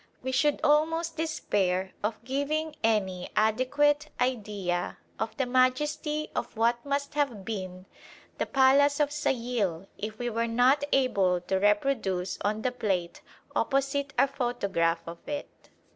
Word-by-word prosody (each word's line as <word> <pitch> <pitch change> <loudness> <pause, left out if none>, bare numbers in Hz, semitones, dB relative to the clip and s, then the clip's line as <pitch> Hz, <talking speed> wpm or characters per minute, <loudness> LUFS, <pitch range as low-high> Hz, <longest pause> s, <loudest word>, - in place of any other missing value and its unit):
We 260 - -2
should 285 +3 +2
almost 325 +3 +2
despair 190 - 0
of 215 +1 -2
giving 295 +4 -2
any 190 -5 0
adequate 290 +7 +2
idea 205 -8 -1 0.2
of 220 0 -3
the 265 - +1
majesty 295 +5 +1
of - - -4
what 235 +1 +2
must 280 0 -2
have 265 -10 -1
been 185 -4 -5 0.5
the - - 0
palace 280 +2 +4
of 290 -1 +2
Sayil 235 - -1
if 215 +1 -5
we 245 - -3
were 230 0 0
not 250 +5 +3
able 195 -9 +3
to 190 +2 -1
reproduce 205 -4 +1
on 215 +2 -1
the 255 - +1
plate 195 -8 -2 0.3
opposite 275 +1 0
our - - +6
photograph 200 -11 0
of 170 0 -8
it. 290 -1 -7
245 Hz, 135 wpm, -28 LUFS, 200-280 Hz, 0.5 s, our